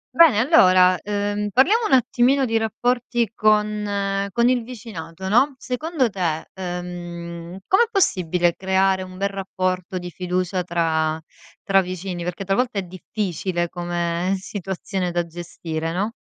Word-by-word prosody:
Bene, 325 -10 +7
allora, 185 - +6
uhm, 205 0 -1
parliamo 405 - +4
un - - 0
attimino 260 +2 +3
di 225 -2 +1
rapporti 240 0 0
con 210 -2 +1
con 235 +5 +2
il 250 -1 +2
vicinato, 200 -7 -8
no. 255 +8 +3
Secondo 265 +2 -1
te, 170 -5 -2
ehm, 175 -1 -6
com'è 460 +5 +4
possibile 180 - +2
creare 190 0 +2
un 185 0 -9
bel 200 +1 0
rapporto 185 -1 -3
di 180 -1 -6
fiducia 180 +2 -2
tra 160 -2 0 0.4
tra 195 0 +4
vicini? 180 -1 -5
Perché 180 +3 -4
talvolta 215 +3 0
è 195 - 0
difficile, 180 -1 -3
come 175 +1 -1
situazione 190 -1 -4
da 175 -1 -1
gestire, 165 -1 -5
no? 205 +5 -1
190 Hz, 135 wpm, -22 LUFS, 175-220 Hz, 0.4 s, Bene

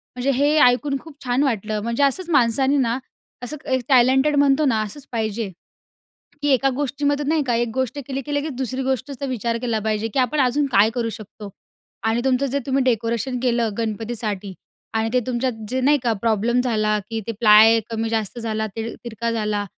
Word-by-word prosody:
म्हणजे 250 +2 0
हे 290 +4 +2
ऐकून 275 +3 +3
खूप 320 -2 -14
छान 250 +2 +1
वाटलं 215 -5 -1
म्हणजे 235 +4 0
असंच 330 +6 0
माणसांनी 270 -1 +3
ना 240 -2 +1 0.5
असं 300 +5 -5
एक 260 -1 +2
टॅलेंटेड 265 +3 +4
म्हणतो 285 +1 +3
ना, 225 -5 +2
असंच 235 +7 -6
पाहिजे 220 -2 -2 0.9
की 290 - +1
एका 270 +1 +3
गोष्टीमध्ये 285 +1 -1
नाही 315 -1 +2
का 240 - +1
एक 240 +1 +1
गोष्ट 260 +2 -2
केली 270 0 -3
की 290 - -3
लगेच 285 +1 -1
दुसरी 260 0 -3
गोष्टचं 265 +2 -2
तर 280 - -2
विचार 235 -2 -2
केला 235 -3 0
पाहिजे 215 +1 -1
की - - 0
आपण 260 +3 +1
अजून 270 +3 +2
काय 205 +3 +5
करू 235 -2 -1
शकतो? 210 -1 -9 0.6
आणि 225 +2 +1
तुमचं 265 +1 +2
जे 275 +2 -1
तुम्ही 270 0 +1
डेकोरेशन 235 +1 0
केलं 235 -3 +1
गणपतीसाठी 215 -3 -3 0.4
आणि 220 0 +1
ते 250 - +3
तुमच्यात 255 0 -1 0.2
जे 260 +3 -1
नाही 290 +3 +4
का 235 -3 +1
प्रॉब्लेम 230 +2 +2
झाला 215 -4 +1
की 225 0 -2
ते 230 - -2
प्लाय 220 0 +7
कमी-जास्त 225 -1 -2
झाला, 220 -1 -2
ते 225 +2 -6
तिरका 235 0 -3
झाला, 210 -2 -1
245 Hz, 190 wpm, -22 LUFS, 225-270 Hz, 0.9 s, प्लाय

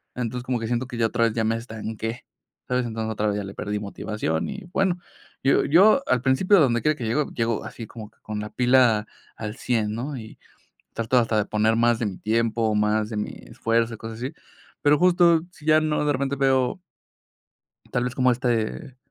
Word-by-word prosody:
Entonces, 125 0 -3
como 125 -2 -1
que 115 - -3
siento 120 +2 -1
que 125 - -8
ya 115 -1 +2
otra 115 +1 +1
vez 115 - 0
ya 115 - 0
me 110 +1 +1
estanqué, 115 0 -6 0.4
¿sabes? 125 0 0
Entonces, 110 -1 -3
otra 105 0 -1
vez 105 - 0
ya 105 - -3
le 95 0 -7
perdí 105 0 -3
motivación 100 -5 -3
y, 205 0 -6
bueno, 190 -2 +1 0.4
yo 135 - +3
yo 195 - +6
al 125 - +2
principio 135 +10 +3
de 165 - +6
donde 120 -3 +2
quiera 155 0 +2
que 125 - -6
llego, 130 +6 0
llego 115 -2 -1
así 110 +1 -8
como 110 -2 -10
que - - -36
con 105 -1 -5
la 105 0 -5
pila 125 -4 +4 0.3
al 105 -1 -6
100, 110 -4 0
¿no? 135 +5 -4
Y 110 -2 -10 0.5
trato 115 +2 0
hasta 115 -2 +1
de 105 - +1
poner 110 +1 +2
más 120 0 +3
de 115 - -1
mi 95 -3 -5
tiempo, 115 0 0
más 105 0 +1
de 110 - -5
mi 105 - -2
esfuerzo, 115 0 -1
y - - -7
cosas 110 0 -8
así. 130 +5 -4 0.5
Pero 145 0 +4
justo 175 -1 +5
si 150 - -17
ya 155 0 +5
no 155 -1 0
de 150 - +2
repente 140 +1 -1
veo 130 +2 +1 1.1
tal 125 - +1
vez 125 0 -3
como 130 -1 +3
este, 120 +2 -2
115 Hz, 215 wpm, -24 LUFS, 110-130 Hz, 1.1 s, yo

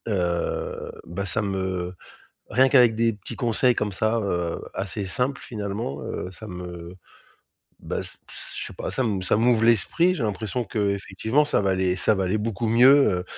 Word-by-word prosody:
heu, 90 -5 -2
ben, 100 +4 -4
ça 95 +4 +2
me 95 -2 -3 0.5
rien 130 +4 +4
qu'avec 125 -4 +5
des 115 +1 +2
petits 100 -2 -9
conseils 120 0 +2
comme 105 -1 -2
ça, 110 +4 +1
heu, 85 -5 -2
assez 100 +1 -3
simples 125 +8 0
finalement, 100 - -5
heu, 90 - -5
ça 110 +3 -9
me 90 -2 -8 0.9
bah - - -4
s - - -4
p - - -38
s - - -2
je - - -4
sais - - -9
pas - - -5
ça 130 - +2
m 100 -6 -1
ça 90 - +3
m'ouvre 115 0 +3
l'esprit, 140 - +3
j'ai 150 - -4
l'impression 110 +3 -2
qu'effectivement 100 +5 0
ça 150 - +1
va 95 - +1
aller 95 -1 +1
ça 105 - +4
va 95 -2 -1
aller 95 +4 0
beaucoup 115 +1 -2
mieux, 120 -5 +5
105 Hz, 185 wpm, -24 LUFS, 95-115 Hz, 0.9 s, qu'avec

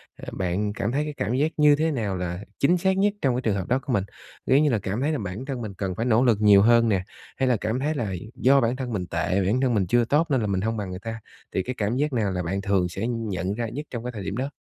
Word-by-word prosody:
à, - - -11
bạn 95 +3 -1
cảm 105 +3 -2
thấy 145 +3 0
cái 150 -1 -5
cảm 105 +4 -1
giác 150 +4 +1
như 150 -1 +6
thế 160 +2 0
nào 105 -8 -2
là 90 0 -3 0.2
chính 175 +6 +4
xác 190 +2 +1
nhất 205 +1 +3
trong 130 -3 +2
cái 125 - -1
trường 110 -4 0
hợp 95 -2 -3
đó 125 +2 +2
của 135 -2 -4
mình? 100 -4 +2 0.4
Ví 135 +3 +4
như 150 - +3
là 115 -4 +1
cảm 100 +6 -3
thấy 150 +3 +1
là 150 - -1
bản 100 +6 -5
thân 130 -4 -4
mình 105 -3 -5
cần 95 -2 -3
phải 115 - -2
nỗ 120 +1 +3
lực 115 -5 +4
nhiều 100 -2 +7
hơn 115 +1 +5
nè, 95 -3 +1 0.3
hay 130 - +1
là 125 -3 +3
cảm 110 +4 -1
thấy 150 +3 -1
là 105 -7 -2 0.2
do 135 +1 +4
bản 120 +2 +1
thân 125 -3 -4
mình 90 -3 -2
tệ, 90 +4 0
bản 120 +7 +1
thân 125 -3 +2
mình 95 -5 +1
chưa 120 +3 +3
tốt 150 +7 +2
nên 130 -4 +2
là 105 - -1
mình 95 -1 0
hông 110 +1 -1
bằng 100 -3 -4
người 90 0 -6
ta, 115 +2 -6 0.3
thì 95 - 0
cái 125 0 -4
cảm 105 +3 0
giác 145 -1 0
nào 105 -5 0
là 90 -1 -2
bạn 95 +3 -2
thường 95 -3 +1
sẽ 100 +6 -3
nhận 100 -6 -2
ra 115 +1 -3
nhất 145 +6 -6
trong 120 -2 -5
cái 125 - -4
thời 105 -4 -7
điểm 100 +5 -4
đó? 135 +2 -2
115 Hz, 310 wpm, -25 LUFS, 100-130 Hz, 0.4 s, nhiều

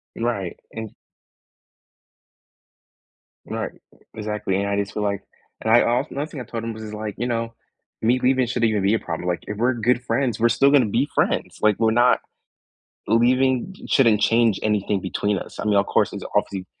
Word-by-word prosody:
Right, 115 -7 -3
and 110 -1 -7 2.5
Right, - - -4 0.2
e - - -23 0.2
exactly, 105 -3 -3
and 100 +1 -1
I 100 - 0
just 100 -1 -2
feel, 105 - -2
like 100 -1 -1 0.4
and 110 - +2
I 120 - +7
also 120 +2 0
nothing, 145 +1 -4
I - - -4
told 115 0 -6
him, 115 0 -3
was 110 0 -9
just, 105 0 -7
like, 105 -1 -5
"You 120 - -2
know, 115 -1 -2 0.5
me 120 +3 +3
leaving 130 0 +2
shouldn't 120 -1 +1
even 105 -3 0
be 100 +2 +3
a 110 - +2
problem, 85 +1 -5
like, 90 -1 -1
if 105 - -4
we're 120 +4 +2
good 120 +2 +1
friends, 125 -4 0
we're 120 +1 +4
still 135 +4 +4
gonna 140 -4 +5
be 120 +7 0
friends, - - 0
like, 105 -2 +3
we're 110 -1 +3
not 120 +2 +4 0.9
leaving 130 - +2
shouldn't 115 -6 +4
change 115 -2 +3
anything 105 -2 0
between 100 +2 -1
us, - - -9
I - - -3
mean, 105 -1 +2
of 100 0 +3
course, - - +1
it's - - -6
obviously 95 -2 -1
110 Hz, 195 wpm, -23 LUFS, 105-120 Hz, 2.5 s, I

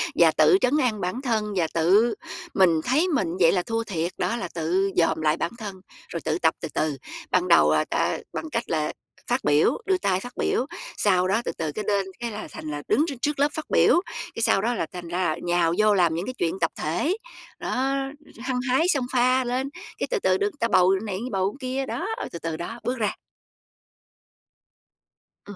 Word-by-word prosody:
và - - +6
tự 385 - +5
trấn 270 +5 +3
an 235 -7 +1
bản 185 +9 -2
thân 220 -5 -1
và 170 -3 +2
tự 200 +8 +4 0.4
mình 170 -5 +4
thấy 300 +9 +2
mình 270 - +1
vậy 165 -2 +6
là 180 -2 +1
thua 230 0 -2
thiệt 175 -4 -2
đó, 230 - 0
là 235 - -3
tự 185 +4 +1
dòm 160 -2 +2
lại 155 0 +2
bản 170 - -2
thân 200 -4 -7 0.3
rồi 170 - -4
tự 155 0 +1
tập 160 - +3
từ - - -3
từ. 150 -3 0 0.3
Ban 180 0 +2
đầu 75 - +6
là 75 - +2
ta - - 0 0.2
bằng 320 - -4
cách 230 -5 -1
là 155 -2 0 0.4
phát 245 +2 0
biểu, 145 +1 +3
đưa 380 -1 +2
tay 190 - +1
phát 245 +5 -8
biểu 250 - +1 0.3
sau 185 -3 +3
đó 210 +5 +2
từ - - -1
từ 160 -2 -2
cái 210 - -5
lên, 200 -2 +2
cái 235 -1 -3
là 210 0 -6
thành 155 - -7
là 145 - -4
đứng 305 - +3
trước 280 - -4
trước 295 -1 -1
lớp 285 - +4
phát 315 - -4
biểu, 350 - +5 0.3
cái 230 - -3
sau 195 - +4
đó 240 +3 +1
là 195 - -1
thành 175 -1 -7
ra 175 - -3
là 155 - -2
nhào 175 -1 +2
vô 215 -1 +4
làm 175 -4 +3
những 170 +3 -2
cái 255 - -4
chuyện 170 +3 -1
tập 165 - +2
thể. 300 - -1 0.4
Đó, 265 +2 -1 0.4
hăng 250 +1 -2
hái 270 +7 +3
xông 280 -8 +2
pha 255 +1 +3
lên, 255 +2 -1 0.3
cái - - -2
từ - - +1
từ - - +2
được 405 - 0
người 410 -7 -4
ta 230 - +2
bầu 180 +1 +5
này, 195 -4 -3
bầu 195 +1 0
cái 260 - -5
kia, 270 +1 -1
đó, 340 +7 -3 0.2
từ 170 - -6
từ 165 -1 -4
đó, 225 +8 -6
bước 250 +3 -1
ra. 215 -4 0 2.3
Ừm, 205 - -9
205 Hz, 225 wpm, -25 LUFS, 170-255 Hz, 2.3 s, và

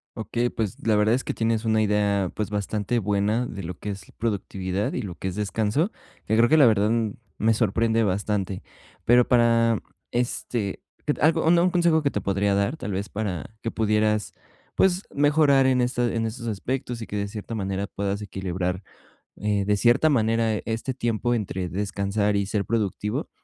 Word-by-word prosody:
Okey, 120 +2 -1
pues, 110 -5 -3
la 110 -1 +3
verdad 105 +2 +3
es 130 +1 0
que - - -3
tienes 115 -1 0
una 110 -1 +2
idea, 100 -3 +1
pues, 105 -1 -2
bastante 105 +2 -1
buena 105 +3 +1
de 100 - -6
lo 85 +1 -6
que 105 - -6
es 100 0 -9
productividad, 100 -3 -2
y 125 - -2
lo 95 -4 -5
que 95 - -5
es 90 - -3
descanso, 110 - 0 0.3
que 110 - +1
creo 115 +1 +5
que 155 - +5
la 145 - +7
verdad 105 -2 +4 0.5
me 115 +1 +3
sorprende 115 +1 +2
bastante. 100 -1 -1 0.4
Pero 120 +1 +5
para 115 -1 +4 0.3
este, 120 -3 -2 0.2
q 150 - +2
t - - -10
algo 160 +1 +3
un 170 +2 +5
consejo 170 -3 +3
que 145 - +1
te 105 - -2
podría 100 +1 +1
dar, 100 +10 0
tal 105 - -5
vez 100 +2 -3
para 100 -2 -4
que 115 - -2
pudieras, 105 -1 +1 0.4
pues, 190 0 +3
mejorar 145 -2 +4
en, 130 -1 +3
este 120 -1 0
en 115 0 0
estos 115 +1 -5
aspectos, 120 +3 -3
y - - -6
que - - -6
de 100 0 -1
cierta 105 +2 -7
manera 100 -2 -2
puedas 100 0 -3
equilibrar, 90 -1 -3 0.5
eh, 105 -1 0
de 105 0 +2
cierta 120 +8 +4
manera 115 -4 +2
este 115 +4 -2
tiempo 120 0 -1
entre 95 -5 -2
descansar 100 +2 -1
y 100 0 +1
ser 100 0 -1
productivo. 110 - -2
110 Hz, 185 wpm, -25 LUFS, 100-120 Hz, 0.5 s, la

